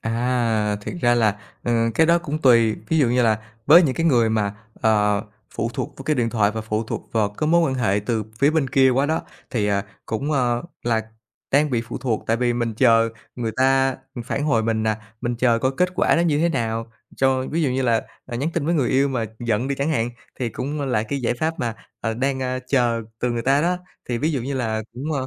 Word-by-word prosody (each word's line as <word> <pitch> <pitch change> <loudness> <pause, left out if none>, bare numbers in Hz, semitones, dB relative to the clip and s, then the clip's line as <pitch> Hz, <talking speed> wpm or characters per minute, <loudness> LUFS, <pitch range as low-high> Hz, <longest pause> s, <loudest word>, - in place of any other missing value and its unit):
À! 115 -3 0
Thiệt 105 - -6
ra 120 0 +4
là, 110 -3 +2 0.2
ờ, 120 - 0 0.2
cái 160 - +4
đó 170 +1 +5
cũng 155 -3 -4
tùy, 115 -4 +5
ví 160 - +2
dụ 130 -5 +4
như 125 +1 +2
là 110 -2 +3 0.3
với 170 +5 +8
những 135 -5 +1
cái 165 0 0
người 120 -6 +4
mà, 105 -2 0 0.3
ờ, 105 -2 +3 0.3
phụ 115 +1 -1
thuộc - - -4
vào 135 - -8
cái 155 -1 +1
điện 115 -2 +1
thoại 105 -3 +2
và 110 +1 -4
phụ 110 +1 -2
thuộc - - -6
vào 110 -3 +2
cái 105 +9 -3
mối 170 +1 +5
quan - - -2
hệ 105 -5 +1
từ 110 -4 0
phía 140 +3 +4
bên 155 -4 +1
kia 130 -1 +5
quá 135 +3 +2
đó, 160 +1 0 0.3
thì, 105 -4 0
à, 100 0 0 0.2
cũng, 140 +7 -2
ơ, 120 -3 +1 0.2
là 115 -2 +1 0.5
đang 145 +1 +3
bị 115 -2 0
phụ 115 - -6
thuộc, 120 -4 -2
tại 115 - +2
vì 120 0 +1
mình 120 -2 -2
chờ 115 -1 +4 0.3
người 115 -3 -2
ta, 135 0 +3 0.2
ừm, 120 - -5
phản 145 +2 -2
hồi 115 -7 +2
mình, 110 -1 0
à, 110 -1 +1 0.2
mình 120 0 -1
chờ 120 -1 +3
coi 130 +3 +1
kết 180 - +3
quả - - +3
nó 170 - +3
như 155 -4 +2
thế 170 +2 +3
nào 115 -5 -2 0.3
cho 130 -1 +2
ví 165 +2 0
dụ 135 - +1
như 130 +1 0
là, 115 -3 +2 0.2
à, 120 -2 -5
nhắn 145 +6 -1
tin 155 -3 -1
với 170 - +2
người 135 -6 +1
yêu 135 +3 +3
mà 120 -4 -1
giận 120 +2 -1
đi 140 - 0
chẳng 140 +4 -1
hạn, 120 -5 0 0.3
thì 120 - 0
cũng 145 +6 -4
là 125 -6 0
cái 135 +5 -3
giải 120 0 0
pháp 160 +6 -2
mà, 115 -2 -2 0.3
ờ, 115 -1 -2
đang, 130 +2 -1
ơ, 130 0 -1
chờ 120 -4 +1 0.2
từ 125 - 0
người 120 -1 -2
ta 135 +3 +3
đó. 180 +2 +1 0.3
Thì 120 -1 -1
ví 155 +4 0
dụ 135 - -1
như 135 +3 -3
là 110 -4 -1
cũng, 145 +5 -4
ơ, 130 -2 -2
120 Hz, 250 wpm, -22 LUFS, 115-140 Hz, 0.5 s, với